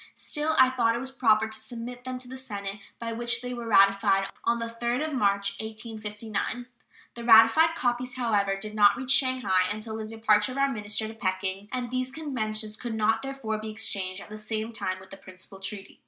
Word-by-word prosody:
Still, 305 +1 -1
I 260 0 +7
thought 230 -3 +2
it - - -2
was 265 +1 -4
proper 220 -4 +3
to 220 - -5
submit 245 +1 -8
them 255 0 -4
to 250 0 -9
the 260 - -8
Senate 205 -6 -5 0.2
by 230 0 -4
which 235 0 -1
they 250 0 -4
were 235 -1 -6
ratified 195 -1 +4 0.2
on 235 - +3
the 230 - -3
3d 235 +4 -1
of 310 - -5
March, 200 -5 +2
1859. 220 +1 -4 0.5
The 235 - -8
ratified 230 +8 +7
copies, 245 +1 -1
however, 205 -6 +1
did 210 +2 -6
not 210 +1 +5
reach 260 +1 -2
Shanghai 250 -10 +3
until 220 +1 -4
after 215 - -5
the 225 - -8
departure 220 +1 +3
of - - -7
our 275 0 +2
minister 210 0 -2
to 220 - -7
Peking, 190 -1 -2
and 250 -1 -3
these 255 0 -1
conventions 220 -8 -3
could 235 -1 -4
not, 220 +1 +2
therefore, 270 -6 -4
be 215 0 -6
exchanged 200 -4 -3
at - - -15
the 215 0 -6
same 220 +1 -3
time 185 -4 -3
with 190 - -15
the 195 - -8
principal 185 0 -11
treaty. 195 0 -5
225 Hz, 210 wpm, -27 LUFS, 210-245 Hz, 0.5 s, I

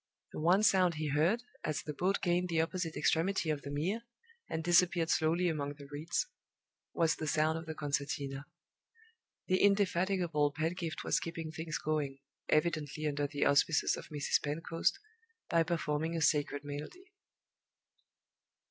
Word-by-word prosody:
The - - -6
one 180 +6 +4
sound 185 -5 +4
he 155 -1 -2
heard, 170 - +2 0.2
as 155 - -2
the 150 - -5
boat 185 +8 0
gained 180 0 +1
the 165 -1 +1
opposite 165 0 -1
extremity 165 0 +1
of 150 -2 -2
the 140 - -7
Mere, 170 +11 -1 0.5
and 160 - -2
disappeared 175 -1 +3
slowly 165 +3 +2
among 145 -3 -2
the 140 -1 -11
reeds, 145 +4 -2 0.7
was 165 -1 +2
the 155 - -4
sound 155 +1 +2
of 165 - -10
the 160 - -5
concertina. 140 -1 -3 1.0
The 185 0 +2
indefatigable 180 -6 +2
Pedgift 165 +1 -3
was - - +2
keeping 165 -1 -5
things 160 0 -4
going 150 -3 -2 0.3
evidently 155 -1 0
under 145 -1 0
the 145 0 -1
auspices 145 +2 +3
of - - -9
Mrs. 145 -1 +1
Pentecost 165 +3 -1 0.5
by 165 - +4
performing 160 -1 -1
a 165 - -1
sacred 145 -1 +1
melody. 150 - -8
160 Hz, 150 wpm, -33 LUFS, 150-175 Hz, 1.0 s, one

